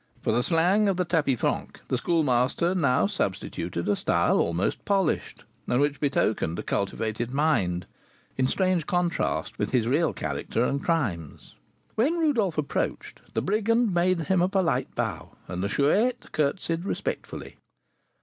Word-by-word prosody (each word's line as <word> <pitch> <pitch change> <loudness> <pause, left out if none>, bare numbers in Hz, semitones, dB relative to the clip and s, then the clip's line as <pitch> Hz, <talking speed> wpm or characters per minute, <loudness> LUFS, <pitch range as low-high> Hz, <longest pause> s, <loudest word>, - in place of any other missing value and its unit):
For - - +1
the 120 +2 +2
slang 180 +8 +3
of 190 - 0
the 180 - +1
tapis 150 -8 +1
franc - - -2
the - - 0
Schoolmaster 150 +1 +1
now 140 -8 +2
substituted 95 - -3
a 105 - +3
style - - +2
almost 85 +3 0
polished, 195 -5 0 0.2
and 125 - +2
which 145 0 +1
betokened 110 - 0
a - - -4
cultivated 110 +3 -2
mind, 125 - +1 0.5
in 130 0 +2
strange 185 0 +1
contrast 175 -1 -1
with - - 0
his 120 -3 +1
real 150 +5 +2
character 115 - -2
and 140 +2 -1
crimes. 100 - -2 0.4
When 285 +10 +1
Rodolph 230 - +1
approached, 150 -2 -2
the - - 0
brigand 220 +2 +2
made 175 0 +2
him 180 +3 +1
a 180 - +3
polite 190 -4 +1
bow, - - -3
and 90 +1 -4
the 100 - -1
Chouette 210 - +1
curtseyed 165 +3 -1
respectfully. 195 - -4
160 Hz, 150 wpm, -26 LUFS, 120-185 Hz, 0.5 s, slang